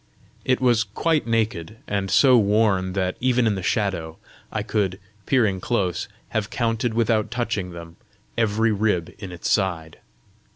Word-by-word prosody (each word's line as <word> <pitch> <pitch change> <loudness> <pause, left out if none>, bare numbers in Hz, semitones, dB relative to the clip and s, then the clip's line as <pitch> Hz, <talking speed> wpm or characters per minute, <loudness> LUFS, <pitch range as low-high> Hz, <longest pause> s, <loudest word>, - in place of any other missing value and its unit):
It 130 - +1
was 120 -3 +3
quite 150 +8 0
naked, 110 -5 -1
and 100 -1 -1
so 130 +3 +6
worn 100 -4 +2
that, 95 -1 -1
even 125 -1 +2
in 110 - +2
the 95 - -4
shadow, 90 -5 -1 0.3
I - - -2
could, 95 -3 -1 0.3
peering 110 -8 +2
close, 95 -8 -1 0.2
have 110 -1 -2
counted 115 -2 -1
without 115 -2 +1
touching 115 -6 -2
them, 85 -1 -10 0.4
every 110 0 +2
rib 105 -5 0
in 95 -4 -7
its 90 -1 -5
side. 85 -6 0
105 Hz, 150 wpm, -23 LUFS, 95-115 Hz, 0.4 s, so